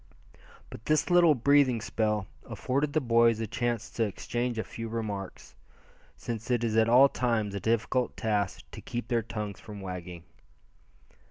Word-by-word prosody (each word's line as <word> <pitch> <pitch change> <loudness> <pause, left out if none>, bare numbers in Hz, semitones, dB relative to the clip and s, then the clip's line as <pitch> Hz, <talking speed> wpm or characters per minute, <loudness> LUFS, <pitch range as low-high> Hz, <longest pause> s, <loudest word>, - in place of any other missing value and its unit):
But 110 - -10
this 155 +3 +1
little 175 -3 +6
breathing 135 -1 +3
spell 110 -2 -1 0.2
afforded 140 +3 -1
the 155 - +3
boys 115 -3 +3
a 115 - -1
chance 120 0 -2
to 115 - -1
exchange 120 +3 -3
a 110 - -1
few 115 0 -7
remarks, 105 -4 -5 0.6
since 115 -1 -6
it 120 -2 +1
is 110 -2 0
at 110 0 +4
all 130 +4 +7
times 115 -6 -1
a 100 - -3
difficult 115 +4 0
task 105 -3 -1
to - - -9
keep 120 -1 -5
their 120 -1 +2
tongues 105 -2 -6
from 105 -2 -10
wagging. 90 -3 -7
115 Hz, 160 wpm, -28 LUFS, 105-125 Hz, 0.6 s, all